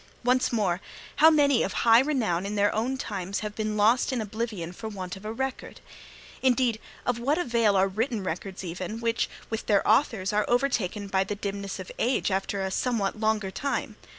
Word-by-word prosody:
'Once 250 +1 +2
more, 195 -6 0 0.4
how 315 - +8
many 285 -5 +4
of - - -1
high 230 0 +6
renown 245 - +1
in 200 +1 -3
their 205 0 +2
own 245 +5 -1
times 200 -5 -4
have 210 -1 -4
been 215 -1 -2
lost 225 +6 +3
in 255 - -1
oblivion 215 -5 -4
for 220 +4 -6
want 185 -3 -6
of 195 +2 -12
a 215 - -3
record! 265 +3 -4 0.6
Indeed, 250 -3 +2 0.3
of 245 -1 0
what 280 +6 +1
avail 235 - +2
are 190 0 +4
written 220 +2 -2
records 185 +2 -5
even, 185 +5 -5
which, 230 0 0 0.2
with 225 - -3
their 205 -2 +3
authors, 215 -4 +2
are 210 0 +2
overtaken 235 -6 0
by 190 -1 +2
the 205 +2 -4
dimness 200 -1 -4
of 185 -1 -8
age 245 -4 +1
after 195 +1 -1
a 190 - -2
somewhat 215 -2 -1
longer 215 -3 0
time? 280 +7 -3
215 Hz, 190 wpm, -27 LUFS, 195-240 Hz, 0.6 s, how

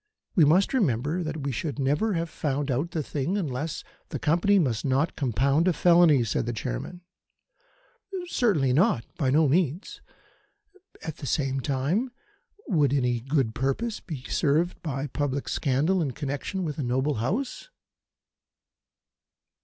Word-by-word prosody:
We 165 - +5
must 180 - +3
remember 155 - +1
that 155 -3 -4
we 140 - -1
should 140 +3 -3
never 145 +10 +1
have 165 -1 -1
found 145 -2 -2
out 140 +7 -1
the 160 -3 -2
thing 150 +8 -2
unless 150 -3 -3
" - - -37
"The - - -3
Company 175 +7 +3
must 130 - +1
not 140 +4 +1
compound 140 - +1
a 185 - +4
felony," 170 -5 +5
said 115 +1 -1
the 120 - -1
Chairman. 110 - -5 1.2
"Certainly 195 - +2
not. 130 -6 +3
By 135 -5 +2
no 150 +3 +4
means. 165 +4 0 1.0
At 160 - -5
the 140 - -7
same 135 0 0
time, 140 - 0 0.6
would 150 - +2
any 125 -3 +1
good 135 -2 0
purpose 135 - -1
be 150 -8 -7
served 160 +6 0
by 140 -3 -3
public 140 0 -2
scandal 150 +8 +1
in 140 -5 -1
connection 145 +7 -3
with 155 -3 -4
a - - -1
noble 130 +3 0
House?" 245 - -2
145 Hz, 145 wpm, -26 LUFS, 135-170 Hz, 1.2 s, We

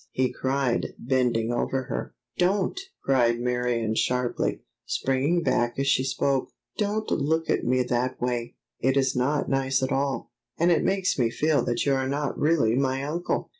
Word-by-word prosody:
he 130 -1 0
cried, 130 -2 -1
bending 120 -3 +1
over 130 +2 -1
her. 60 - -5 0.2
"Don't!" 195 - +1 0.2
cried 120 -3 +3
Marion 125 -2 0
sharply, 125 +2 0 0.2
springing 140 +6 +1
back 120 -3 +1
as 135 - 0
she 130 -1 +3
spoke. 135 0 0 0.3
"Don't 215 +1 -1
look 160 +3 +1
at - - +1
me 130 +1 +2
that 125 +1 -1
way; 120 -1 -2 0.2
it 130 +1 +2
is 135 0 +2
not 140 +4 +1
nice 135 -1 +1
at 130 - -1
all, 135 -1 -1 0.3
and 170 +2 +3
it 165 - +3
makes 190 -5 +1
me 120 -2 +3
feel 145 +1 +1
that 120 - 0
you 140 - +3
are 130 -1 0
not 145 0 -1
really 145 -8 +2
my 135 0 0
uncle!" 165 +5 -2
130 Hz, 170 wpm, -26 LUFS, 125-145 Hz, 0.3 s, cried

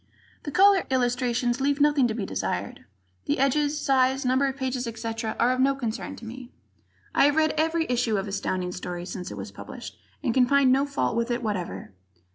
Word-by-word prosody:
The 290 - -3
cover 390 +3 +5
illustrations 245 -1 0
leave 280 +1 +1
nothing 290 -3 +4
to 220 - -3
be 215 -4 -3
desired. 95 - -4 0.4
The - - 0
edges, 290 +2 +1
size, 265 -1 +2
number 260 +2 +3
of 270 0 -4
pages, 260 -2 -2
etc., 225 0 -4
are 245 - +4
of 255 - -1
no 275 +1 +3
concern 235 -5 -4
to - - -11
me. 245 +2 -9 0.6
I - - +5
have 290 0 +3
read 315 -1 +3
every 320 +1 +1
issue 240 -3 +1
of 195 +1 -3
Astounding 185 -2 -2
Stories 180 0 -6
since 180 -1 -5
it - - -8
was - - -7
published - - -9 0.2
and 245 -5 +1
can 250 0 +4
find 280 -1 +4
no 275 +2 +3
fault 280 -5 -1
with 235 +1 0
it 240 0 -1
whatever. 195 - -4
255 Hz, 200 wpm, -26 LUFS, 225-275 Hz, 0.6 s, cover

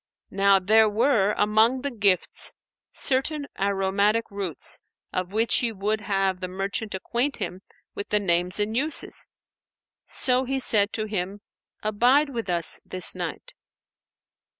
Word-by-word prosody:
Now, 195 0 +4
there 215 +3 +4
were, 210 -2 +2
among 220 +5 +2
the 280 +1 -3
gifts, 200 -6 0 0.4
certain 285 +3 -1
aromatic 200 +3 0
roots 195 -5 -1 0.3
of 185 0 -3
which 225 +3 +2
he 235 -2 -1
would 210 +1 -2
have 195 -2 -1
the 185 - -4
merchant 195 +3 -4
acquaint 240 +8 -2
him 185 +1 -5 0.3
with 200 - -6
the 210 - +2
names 180 0 0
and 210 +2 -1
uses; 290 +4 0 0.8
so 255 0 +3
he 270 +1 -2
said 210 -5 +5
to 215 - -2
him, 200 -1 -4 0.4
"Abide 245 +8 +2
with 230 -5 -5
us 170 -2 +1
this 185 -1 0
night." - - -7
210 Hz, 135 wpm, -24 LUFS, 195-235 Hz, 0.8 s, said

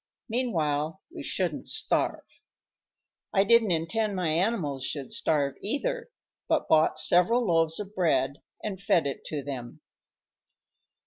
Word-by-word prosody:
Meanwhile 165 - -1 0.2
we - - -5
shouldn't - - -2
starve. - - -2 0.9
I 195 - +6
didn't 230 +1 +5
intend 195 +6 0
my 180 -3 0
animals 160 - 0
should 140 -1 -3
starve, 145 -3 +1
either, 475 - -2 0.4
but - - +1
bought 155 0 +4
several 180 +10 +4
loaves 165 -2 +2
of 205 0 -6
bread 140 -8 +1 0.2
and 195 -3 -4
fed 175 -5 +3
it 140 -2 -4
to 145 -3 -4
them. 130 -4 -7
170 Hz, 125 wpm, -28 LUFS, 150-210 Hz, 0.9 s, I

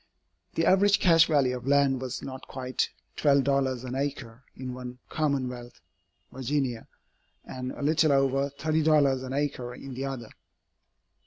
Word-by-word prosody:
The 165 - +1
average 200 +2 +4
cash 165 -2 +5
value 135 -5 +2
of 125 +1 -8
land 140 -2 +3
was 130 -1 -5
not 130 0 -8
quite 130 -1 -2 0.3
$12 135 -3 +2
an 125 -1 -5
acre 135 -3 -4
in 130 -1 -6
one 125 0 -8
commonwealth 130 -5 -2 0.5
(Virginia), 130 -2 -2 0.6
and 130 0 -5
a - - -7
little 155 +1 +3
over 135 0 +2
$30 150 -2 +2
an 130 0 -5
acre 135 -4 -2
in 135 +1 -9
the 130 +2 -4
other. 130 -5 -6
135 Hz, 140 wpm, -27 LUFS, 125-145 Hz, 0.6 s, cash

